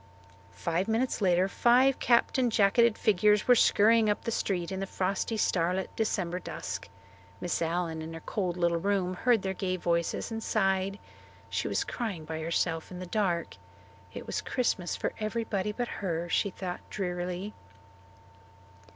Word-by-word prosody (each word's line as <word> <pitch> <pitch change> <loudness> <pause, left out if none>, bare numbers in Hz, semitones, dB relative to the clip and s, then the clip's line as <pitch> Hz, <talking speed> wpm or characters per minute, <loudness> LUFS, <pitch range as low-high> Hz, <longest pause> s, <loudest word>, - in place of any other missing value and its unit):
Five 170 - -1
minutes 225 +2 0
later 185 -1 +3
five 250 +6 +4
capped 235 +2 +3
and 245 -2 +2
jacketed 220 +2 +4
figures 210 0 +3
were 250 - +8
scurrying 225 -1 +5
up 205 - 0
the 230 - -2
street 185 -5 -1
in 190 - -3
the 195 - -3
frosty, 195 +4 -1
starlit 180 -1 0
December 185 -5 -1
dusk. 100 - -6 0.5
Miss 175 - -2
Allen 165 -1 -1
in 160 +1 -6
her - - -6
cold 180 -2 -2
little 170 -1 +2
room 190 -1 0
heard 230 +3 +2
their 190 0 -1
gay 185 -1 -2
voices 170 +4 -1
and 225 0 -3
sighed. 195 -2 +1 0.5
She - - -1
was - - 0
crying 200 -10 -4
by 160 0 -4
herself 165 0 -1
in 180 - -8
the 185 - -6
dark. 180 -3 -1 0.5
It - - -8
was - - -2
Christmas 200 -8 -1
for - - -2
everybody 215 -2 -1
but 240 +3 -3
her, 170 -3 -2
she 200 - +2
thought 180 -1 -5
drearily. 180 +1 -3
190 Hz, 160 wpm, -29 LUFS, 175-215 Hz, 0.5 s, were